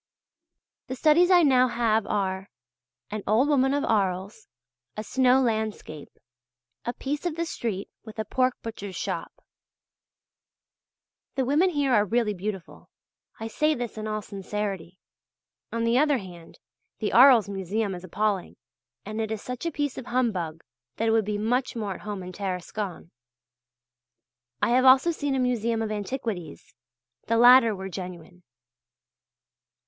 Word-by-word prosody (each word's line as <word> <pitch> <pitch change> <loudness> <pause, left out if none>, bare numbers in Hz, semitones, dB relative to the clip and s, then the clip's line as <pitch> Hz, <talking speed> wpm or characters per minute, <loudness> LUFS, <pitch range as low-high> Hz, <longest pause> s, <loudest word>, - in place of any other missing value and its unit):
The 260 - -4
studies 315 +6 +4
I 355 -2 +6
now 255 -3 +5
have 225 -3 +1
are: 190 -1 -2 0.6
"An 215 0 -3
Old 225 +7 +3
Woman 270 -2 +3
of 285 0 0
Arles," 195 -2 -1 0.5
"A 215 - -3
Snow 255 +2 +3
Landscape," 220 - -2 0.8
"A 240 - -2
Piece 285 +3 -4
of 325 - -3
the 335 +1 -2
Street 220 - -4 0.2
with 220 -1 -11
a 220 - -2
Pork 255 +1 +1
Butcher's 205 -4 -7
Shop." - - -4 2.0
The 265 - 0
women 300 +8 +3
here 285 -6 0
are 210 -3 +5
really 220 +1 0
beautiful. 195 -1 -7 0.5
I 225 - -4
say 305 +7 +1
this 240 -2 -5
in 215 0 -5
all 215 -1 -3
sincerity. 195 -3 -5 0.7
On 230 0 -2
the 230 +2 +3
other 295 -1 +3
hand, 175 -5 -11 0.4
the 210 - -2
Arles 245 -3 +7
Museum 200 +1 -2
is 175 0 -8
appalling, 200 +1 -2 0.5
and 215 +2 -4
it 220 - -2
is 220 -2 -4
such 250 +6 -5
a - - -1
piece 290 -4 -2
of 255 - -10
humbug 190 -11 -1 0.3
that 225 - 0
it - - +3
would 225 -2 +2
be 210 0 -2
much 245 +5 0
more 210 -4 -3
at - - -11
home 205 -3 -5
in 180 - -7
Tarascon. 185 -1 -5 1.5
I - - +3
have 255 +2 +4
also 265 +6 +6
seen 290 -4 -2
a - - 0
museum 235 -2 0
of 215 - -3
antiquities 205 - -5 0.5
the 230 - +2
latter 240 -2 +7
were 190 0 -6
genuine. 180 -1 -8
220 Hz, 150 wpm, -26 LUFS, 195-255 Hz, 2.0 s, Arles